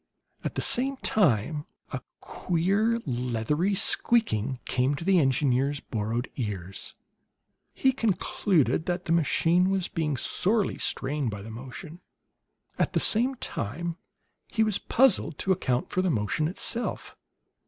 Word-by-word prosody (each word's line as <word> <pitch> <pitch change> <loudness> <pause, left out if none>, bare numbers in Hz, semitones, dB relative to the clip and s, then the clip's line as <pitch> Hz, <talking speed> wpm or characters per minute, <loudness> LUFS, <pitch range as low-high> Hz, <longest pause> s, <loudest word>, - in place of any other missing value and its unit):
At - - -4
the - - 0
same 270 +2 +4
time 150 - +1 0.3
a - - -3 0.2
queer, 200 +7 0
leathery 125 - -1
squeaking 135 - +2
came 130 +3 +1
to 165 - -7
the 190 -2 +4
engineer's 135 0 +1
borrowed 115 +2 -3
ears; 100 -6 -5 0.8
he 265 - +2
concluded 190 - +1
that 180 0 -2
the - - -2
machine 170 +3 +3
was 195 -2 0
being 150 -4 -2
sorely 205 - 0
strained 135 -1 -1
by 100 -2 -6
the 110 - -8
motion. 135 - -9 0.8
At - - +1
the 250 +5 +2
time 165 +10 -4 0.5
he 220 - +1
was 215 -3 +1
puzzled 210 - +3
to 190 - -1
account 130 -9 0
for 185 - +1
the 185 - +1
motion 135 +4 0
itself. 230 +7 -1
160 Hz, 130 wpm, -27 LUFS, 125-195 Hz, 0.8 s, same